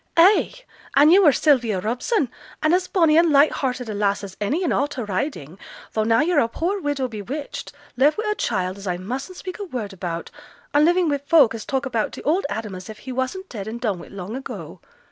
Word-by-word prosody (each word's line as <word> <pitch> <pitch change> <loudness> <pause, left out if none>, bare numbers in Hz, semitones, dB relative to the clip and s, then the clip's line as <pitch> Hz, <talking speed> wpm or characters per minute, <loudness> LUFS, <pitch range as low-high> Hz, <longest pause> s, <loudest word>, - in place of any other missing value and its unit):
'Ay! 375 +5 +6 0.4
and 290 +3 +7
yo' 390 - +7
were 315 -6 +7
Sylvia 245 - +2
Robson, 250 - -1 0.3
and 310 +2 +3
as 365 0 +2
bonny 325 -5 +3
and 335 0 +4
light 285 +1 +6
hearted 250 -2 -2
a 215 - -4
lass 205 0 0
as 190 -2 -8
any 290 - 0
in 345 - 0
a' 285 - +2
t' 265 -4 -5
Riding, 185 - -4 0.3
though 215 - +1
now 225 +1 +3
yo're 330 0 +2
a 230 - +3
poor 365 - -2
widow 285 -4 -1
bewitched, 245 +6 -6 0.2
left 280 - +3
wi' 435 - -1
a - - +2
child 190 - -2
as 200 - -8
I 180 -1 -1
mustn't 260 - -6
speak 370 0 -7
a - - -3
word 240 - -5
about, 175 -3 -5 0.4
an' 295 +1 +5
living 350 +1 +3
wi' 285 -2 0
folk 280 -4 +4
as 225 -1 -6
talk 270 0 -1
about 235 -5 -1
t' - - -8
old 320 +2 +1
Adam 215 -2 -4
as 185 +1 -8
if 215 - -8
he 260 - -8
wasn't 260 +10 -3
dead 205 - -7
and 230 +2 -5
done 210 -7 -1
wi' - - -10
long 195 +3 -7
ago! 265 - -7
260 Hz, 230 wpm, -22 LUFS, 210-310 Hz, 0.4 s, and